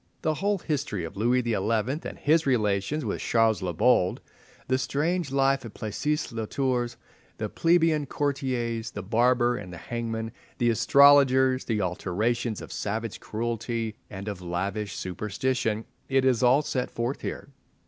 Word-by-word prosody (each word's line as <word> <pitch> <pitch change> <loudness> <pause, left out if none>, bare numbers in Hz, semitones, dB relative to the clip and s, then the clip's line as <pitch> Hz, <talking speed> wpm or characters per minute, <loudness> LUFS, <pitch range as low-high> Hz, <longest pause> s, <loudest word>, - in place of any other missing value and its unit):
The 155 - +2
whole 200 +5 0
history 140 - -2
of 80 +4 -7
Louis 120 +5 +2
XI. 120 -1 -1 0.6
and - - -11
his 160 +1 +3
relations 110 +3 +1
with 105 - -2
Charles 115 -4 +2
the 90 -1 -2
Bold, 90 +1 +3 0.5
the 130 0 +1
strange 160 +3 -1
life 135 0 +2
at 115 - -9
Plessis 150 +8 -2
le 115 -2 -4
Tours, 125 -2 -1 0.4
the - - -2
plebeian 165 -3 +2
courtiers, 125 -6 -2
the - - -7
barber 120 +3 +3
and 95 -3 -8
the 90 - -8
hangman, 115 +3 -4 0.3
the 120 -1 +3
astrologers, 130 0 +5
the 110 -3 0
alternations 105 +5 -1
of - - -9
savage 110 +1 -3
cruelty 115 0 -3 0.2
and 100 0 -7
of 100 -3 -4
slavish 95 +4 -3
superstition—it 110 +6 -2
is 125 -3 +3
all 130 +4 +5
set 130 -3 -2
forth 120 +4 -3
here. - - -5
120 Hz, 150 wpm, -27 LUFS, 105-135 Hz, 0.6 s, astrologers